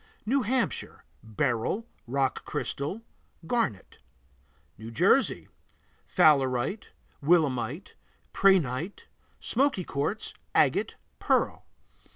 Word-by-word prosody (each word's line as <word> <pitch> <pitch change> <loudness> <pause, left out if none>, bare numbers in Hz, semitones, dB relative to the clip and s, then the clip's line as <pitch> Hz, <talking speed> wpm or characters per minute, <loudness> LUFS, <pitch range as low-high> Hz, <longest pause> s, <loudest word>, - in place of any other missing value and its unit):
New 265 +5 +2
Hampshire 250 +2 -2 0.2
Beryl, 115 - -1 0.2
rock 135 +1 0
crystal, 170 +11 -4 0.4
garnet. 165 - -2 0.8
New 110 +1 -9
Jersey 115 - +2 0.6
Fowlerite, 135 - +3 0.4
willemite, 145 - +1 0.4
prehnite, 175 -3 +2 0.4
smoky 260 -6 +1
quartz, 170 +9 -3 0.2
agate, - - +2 0.2
pearl. - - 0
150 Hz, 75 wpm, -28 LUFS, 125-210 Hz, 0.8 s, Fowlerite